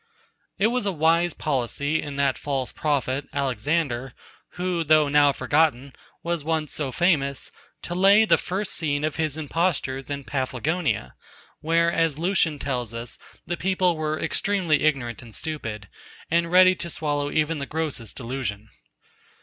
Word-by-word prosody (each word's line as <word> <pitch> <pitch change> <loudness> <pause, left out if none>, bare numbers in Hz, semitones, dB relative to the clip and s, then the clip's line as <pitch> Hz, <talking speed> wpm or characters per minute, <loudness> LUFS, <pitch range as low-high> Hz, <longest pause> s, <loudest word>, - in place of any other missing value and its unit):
It 200 - +2
was 250 -5 0
a - - +2
wise 165 +1 +2
policy 145 +2 -1
in 145 -1 -6
that 140 -1 +2
false 135 -3 -3
prophet, 140 -2 -1
Alexander, 135 -1 -1 0.4
who 180 -1 -1
though 155 -1 +4
now 145 0 +5
forgotten, 140 -1 +1 0.3
was 170 -3 -1
once 155 -1 -1
so 140 -4 -2
famous, 140 -5 +1 0.3
to 175 - -4
lay 200 +4 +6
the - - +4
first 190 +2 -3
scene 145 -3 -1
of 155 -1 -1
his 155 -2 -1
impostures 145 -4 -1
in 140 -1 -4
Paphlagonia, 135 - -2 0.5
where, 165 +1 +2
as 165 -4 +1
Lucian 170 -3 +1
tells 125 -5 -3
us, 115 +1 -6 0.3
the 175 - -2
people 185 -1 +1
were 155 0 -2
extremely 170 -2 +1
ignorant 130 -6 0
and 115 -3 -9
stupid, 110 -10 -4 0.4
and 170 0 +2
ready 185 0 +7
to 170 -1 -5
swallow 145 -3 -1
even 155 +1 0
the 140 - -4
grossest 150 -9 -3
delusion. 115 -4 -5
150 Hz, 150 wpm, -24 LUFS, 135-170 Hz, 0.5 s, ready